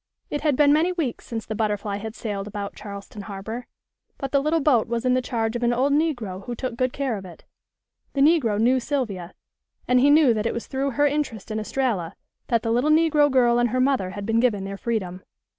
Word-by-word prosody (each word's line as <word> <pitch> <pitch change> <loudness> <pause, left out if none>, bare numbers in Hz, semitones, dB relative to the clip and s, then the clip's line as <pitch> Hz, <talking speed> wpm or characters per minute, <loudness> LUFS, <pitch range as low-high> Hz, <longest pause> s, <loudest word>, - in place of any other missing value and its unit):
It 290 - -2
had 295 -3 +2
been 290 +1 +5
many 325 +4 +3
weeks 320 -10 -3
since 225 -2 -4
the 220 - -4
Butterfly 210 -1 -1
had 220 +2 -7
sailed 205 -3 -4
about 205 -1 -5
Charleston 200 0 -8
harbor. 215 +4 -6 0.5
But 275 -2 -5
the 280 - +3
little 310 +3 +1
boat 265 -7 +3
was 235 +1 -2
in 250 - +3
the 255 - +2
charge 230 -3 -2
of 240 - -2
an 240 0 +2
old 265 +4 +2
negro 245 - -1
who 240 - -4
took 255 0 -4
good 255 +1 0
care 265 -5 -2
of 195 - -8
it. 175 -2 -12 0.7
The 275 - 0
negro 275 -9 +4
knew 250 +4 +3
Sylvia, 225 - -3 0.5
and 250 0 +4
he 275 +3 +5
knew 290 -4 +6
that 215 0 -1
it - - -2
was 235 - -4
through 270 0 -2
her 290 - +4
interest 275 -8 -2
in 215 - -1
Estralla 215 -7 -2 0.3
that 230 -2 +1
the 225 - 0
little 245 +6 +2
negro 310 -2 +4
girl 240 -3 +3
and 240 0 +2
her 255 +3 -1
mother 255 -8 +2
had 200 +1 -6
been 225 +1 +2
given 225 -5 +1
their 195 0 -5
freedom. 195 -4 -3
240 Hz, 225 wpm, -24 LUFS, 210-275 Hz, 0.7 s, knew